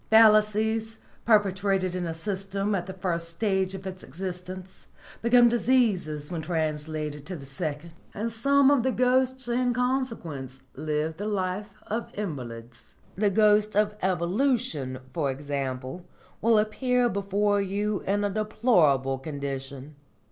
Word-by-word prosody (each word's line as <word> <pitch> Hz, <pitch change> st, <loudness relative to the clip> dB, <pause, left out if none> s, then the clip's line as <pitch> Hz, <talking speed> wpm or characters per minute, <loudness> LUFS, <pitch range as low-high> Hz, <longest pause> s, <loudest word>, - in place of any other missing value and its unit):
Fallacies 220 Hz, 0 st, +4 dB, 0.3 s
perpetrated 195 Hz, -3 st, +2 dB
in 180 Hz, -1 st, -2 dB
a 165 Hz, -, -3 dB
system 195 Hz, +3 st, -2 dB
at 185 Hz, -2 st, -1 dB
the 190 Hz, -, -5 dB
first 175 Hz, -3 st, -2 dB
stage 190 Hz, +1 st, 0 dB
of 190 Hz, 0 st, -9 dB
its 185 Hz, -1 st, -6 dB
existence 185 Hz, +3 st, -7 dB, 0.3 s
become 240 Hz, +1 st, +6 dB
diseases 215 Hz, -, +1 dB
when 170 Hz, -2 st, -3 dB
translated 155 Hz, -2 st, -2 dB
to 185 Hz, -, -4 dB
the 140 Hz, -4 st, -9 dB
second, 150 Hz, +4 st, -4 dB, 0.2 s
and 225 Hz, +3 st, -3 dB
some 275 Hz, +5 st, +4 dB
of 285 Hz, -3 st, +4 dB
the 260 Hz, +2 st, +1 dB
ghosts 255 Hz, +1 st, +2 dB
in 245 Hz, 0 st, +1 dB
consequence 225 Hz, -, -2 dB
live 155 Hz, +2 st, -2 dB
the 205 Hz, -, -3 dB
life 200 Hz, 0 st, -2 dB
of 230 Hz, +2 st, -3 dB
invalids. 120 Hz, -, -7 dB, 0.2 s
The 205 Hz, +2 st, +2 dB
ghost 210 Hz, +1 st, +3 dB
of 210 Hz, 0 st, +3 dB
Evolution, 185 Hz, -, 0 dB, 0.2 s
for 150 Hz, -5 st, 0 dB
example, 135 Hz, +2 st, -4 dB, 0.4 s
will 230 Hz, +1 st, +4 dB
appear 245 Hz, +3 st, +2 dB
before 200 Hz, -1 st, +1 dB
you 200 Hz, +1 st, -1 dB
in 205 Hz, +1 st, +1 dB
a 205 Hz, -, +1 dB
deplorable 175 Hz, -, +2 dB
condition. 140 Hz, -1 st, -6 dB
190 Hz, 135 wpm, -27 LUFS, 155-220 Hz, 0.4 s, become